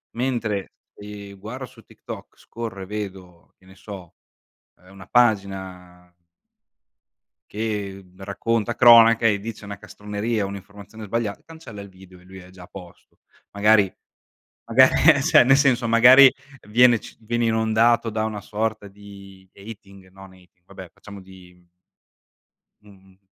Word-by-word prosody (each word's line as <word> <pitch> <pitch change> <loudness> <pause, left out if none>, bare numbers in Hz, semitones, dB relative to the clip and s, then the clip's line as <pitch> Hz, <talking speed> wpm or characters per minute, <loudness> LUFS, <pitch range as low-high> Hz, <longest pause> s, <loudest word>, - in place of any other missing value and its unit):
mentre, 115 -5 -3 0.2
ehm, 100 -1 -11
guarda 120 +7 -8
su - - -18
TikTok, - - -12
scorro 115 -4 -8
e - - -7
vedo, 95 -4 -9
che 95 - -27
ne 95 0 -18
so, 95 -4 -12 0.6
ehm, 90 +2 -21
una 95 -1 -14
pagina 95 -6 -2 1.4
che 105 -3 -5
racconta 110 +4 -3
cronache 115 -1 +6
e 100 -1 -1
dice 110 0 -9
una 100 0 -8
castroneria, 105 +2 -5
un'informazione 100 +2 -11
sbaglia 105 -1 -3
cancella 160 -11 -12
il 100 - -12
video 95 -1 -18
e - - -21
lui 95 +1 -13
è 90 0 -15
già 95 -1 -15
a - - -14
posto. 90 -3 -15 0.3
Magari 100 -1 +2 0.7
magari - - +4
eh, - - +2
cioè, - - +5
nel 135 +2 +4
senso, 130 -4 +1
magari 130 +4 +7 0.4
viene 120 +1 +4
ci - - -14
viene 120 +1 -2
inondato 115 +1 +1
da 110 0 -3
una 110 -2 -5
sorta 110 0 -4
di 100 -1 -16
hating 100 -2 -14
no, 95 +1 -14
nei 95 -1 -21 0.2
vabbè, 95 -3 -12
facciamo 100 -1 -13
di 90 -2 -18 1.2
Mh-mh. 95 -2 -21
100 Hz, 140 wpm, -22 LUFS, 95-115 Hz, 1.4 s, magari